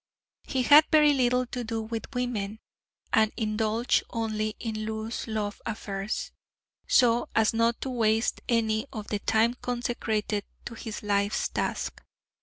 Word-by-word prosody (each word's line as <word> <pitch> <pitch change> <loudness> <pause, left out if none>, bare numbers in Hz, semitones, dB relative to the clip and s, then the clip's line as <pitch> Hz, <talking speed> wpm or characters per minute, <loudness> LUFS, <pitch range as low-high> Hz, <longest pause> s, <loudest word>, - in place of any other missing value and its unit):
He 260 -2 -1
had 295 +4 +8
very 300 -1 +6
little 250 -1 +2
to 245 0 -5
do 225 -1 -3
with 225 0 -5
women, 220 -4 -2 0.6
and 220 -1 +4
indulged 220 +2 +1
only 215 -2 -2
in 220 -2 -3
loose 220 +1 -4
love 215 -2 -3
affairs{H} 205 -2 -4 0.6
so 240 -2 +4
as 220 0 +3
not 230 +1 +2
to 265 - -3
waste 225 -1 +1
any 220 0 +1
of 215 -5 -7
the 210 - -1
time 225 +3 +2
consecrated 235 -4 -2 0.2
to 240 - -6
his 220 -1 -7
life's 200 0 +1
task. - - -3
225 Hz, 140 wpm, -27 LUFS, 215-240 Hz, 0.6 s, had